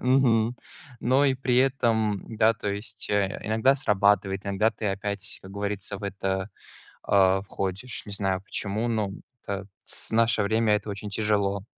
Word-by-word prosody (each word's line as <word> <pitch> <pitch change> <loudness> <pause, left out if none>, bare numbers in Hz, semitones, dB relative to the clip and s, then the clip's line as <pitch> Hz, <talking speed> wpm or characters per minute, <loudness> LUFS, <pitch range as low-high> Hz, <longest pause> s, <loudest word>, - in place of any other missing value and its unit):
Мгм. 125 -2 +3 0.4
Но 130 +4 +3
и 135 -2 +4
при 125 -1 0
этом, 115 -6 +2 0.2
да, 110 +1 +4
то 105 -2 -4
есть, 105 0 -5
э, 100 -2 0
иногда 110 +5 +3
срабатывает, 100 -6 +2
иногда 100 +3 +2
ты 110 0 -5
опять, 100 0 -3
как 95 - -11
говорится, 100 0 -4
в 100 - -7
это, 95 0 -2 0.5
а, 95 -1 +4
входишь. 100 +4 -3
Не 105 - -8
знаю 95 -2 -1
почему, 105 +2 -2
но 110 -4 0 0.3
это 100 -1 -4 0.2
с - - -6
наше 115 -1 +3
время 110 +1 +2
это 105 0 -2
очень 100 +1 -5
тяжело. 100 -2 0
105 Hz, 160 wpm, -26 LUFS, 100-115 Hz, 0.5 s, и